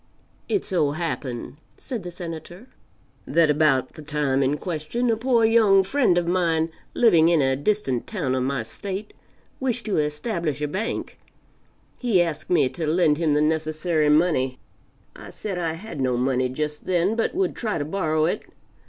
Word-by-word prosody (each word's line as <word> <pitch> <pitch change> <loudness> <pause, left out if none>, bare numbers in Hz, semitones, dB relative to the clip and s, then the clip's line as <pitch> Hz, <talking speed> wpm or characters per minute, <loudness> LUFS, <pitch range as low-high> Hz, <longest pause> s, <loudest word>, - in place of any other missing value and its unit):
It 405 - 0
so 155 -7 +1
happened, 145 -6 -4 0.2
(said 245 -6 -5
the 180 - -6
Senator,) 175 +3 -8 0.6
that 165 -3 +4
about 150 -3 +2
the 155 - -10
time 145 -3 0
in 140 +2 +1
question, 180 +10 -2
a - - +2
poor 235 0 +2
young 215 -4 +5
friend 215 -4 +2
of 175 - +1
mine, 165 -2 +1 0.2
living 170 -9 +5
in 170 -2 +4
a 135 -1 +2
distant 145 - -1
town 165 - -2
of 130 - 0
my 130 -2 -1
State, 195 - -6 0.5
wished 245 -3 -1
to 215 - 0
establish 150 - -2
a 150 - -1
bank; 195 +10 -4 0.8
he 235 -7 +2
asked 155 -3 -1
me 170 -7 +4
to 160 +1 -4
lend 155 -2 +3
him 155 -3 +2
the 150 - +3
necessary 155 0 +1
money; 150 -5 +2 0.6
I - - -10
said 195 -4 -5
I 165 -2 -1
had 165 -4 -7
no, 125 -2 +1
money 130 0 +1
just 150 +3 -4
then, 185 +4 +2
but 230 - -1
world 380 0 0
try 215 -3 -2
to 145 - -2
borrow 155 -2 0
it. 170 - -1
165 Hz, 170 wpm, -24 LUFS, 150-195 Hz, 0.8 s, young